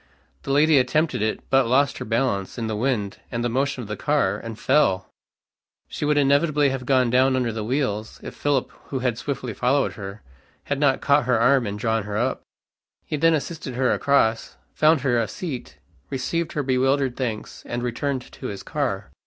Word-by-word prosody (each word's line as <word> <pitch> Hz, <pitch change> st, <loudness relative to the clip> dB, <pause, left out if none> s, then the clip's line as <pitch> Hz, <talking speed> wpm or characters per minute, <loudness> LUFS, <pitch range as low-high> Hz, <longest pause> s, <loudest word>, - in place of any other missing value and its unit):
The 140 Hz, -, -4 dB
lady 150 Hz, +1 st, +5 dB
attempted 155 Hz, +1 st, +1 dB
it, 110 Hz, 0 st, -1 dB
but 135 Hz, -2 st, +4 dB
lost 135 Hz, +3 st, +2 dB
her -, -, -5 dB
balance, 115 Hz, -4 st, -1 dB
in 115 Hz, -, -2 dB
the 110 Hz, -1 st, -2 dB
wind 105 Hz, -4 st, -1 dB
and 120 Hz, 0 st, -2 dB
the -, -, +1 dB
motion 135 Hz, +1 st, -1 dB
of -, -, -9 dB
the 105 Hz, -, -4 dB
car, 145 Hz, +6 st, +1 dB
and 115 Hz, -1 st, -7 dB
fell! 100 Hz, -11 st, +2 dB, 0.8 s
She -, -, -3 dB
would 150 Hz, 0 st, +2 dB
inevitably 145 Hz, +1 st, +3 dB
have 130 Hz, -2 st, -4 dB
gone 130 Hz, -3 st, +3 dB
down 130 Hz, +1 st, +4 dB
under 125 Hz, -2 st, 0 dB
the 110 Hz, -1 st, -4 dB
wheels, 110 Hz, -3 st, -2 dB
if -, -, -7 dB
Philip, 145 Hz, -3 st, 0 dB
who 135 Hz, -, -4 dB
had 125 Hz, -3 st, -1 dB
swiftly 130 Hz, -5 st, -4 dB
followed 135 Hz, +6 st, +1 dB
her, 100 Hz, 0 st, -8 dB, 0.4 s
had 140 Hz, -1 st, -2 dB
not 140 Hz, -2 st, +2 dB
caught 140 Hz, -2 st, +3 dB
her 125 Hz, -2 st, +2 dB
arm 125 Hz, 0 st, +4 dB
and 100 Hz, 0 st, -4 dB
drawn 110 Hz, 0 st, 0 dB
her 105 Hz, 0 st, -3 dB
up. 120 Hz, +4 st, 0 dB, 0.6 s
He -, -, -3 dB
then 165 Hz, +2 st, +4 dB
assisted 150 Hz, -4 st, -5 dB
her 130 Hz, 0 st, +2 dB
across, 115 Hz, -5 st, +1 dB, 0.2 s
found 155 Hz, -1 st, +4 dB
her 125 Hz, -3 st, +2 dB
a 115 Hz, -, 0 dB
seat, 120 Hz, -, -6 dB, 0.3 s
received 165 Hz, +6 st, -2 dB
her 145 Hz, -, -1 dB
bewildered 135 Hz, 0 st, +1 dB
thanks, 115 Hz, -5 st, -4 dB
and 120 Hz, 0 st, -3 dB
returned 130 Hz, +2 st, -2 dB
to 130 Hz, -, -7 dB
his 100 Hz, -4 st, -6 dB
car. -, -, -3 dB
130 Hz, 195 wpm, -23 LUFS, 115-140 Hz, 0.8 s, lady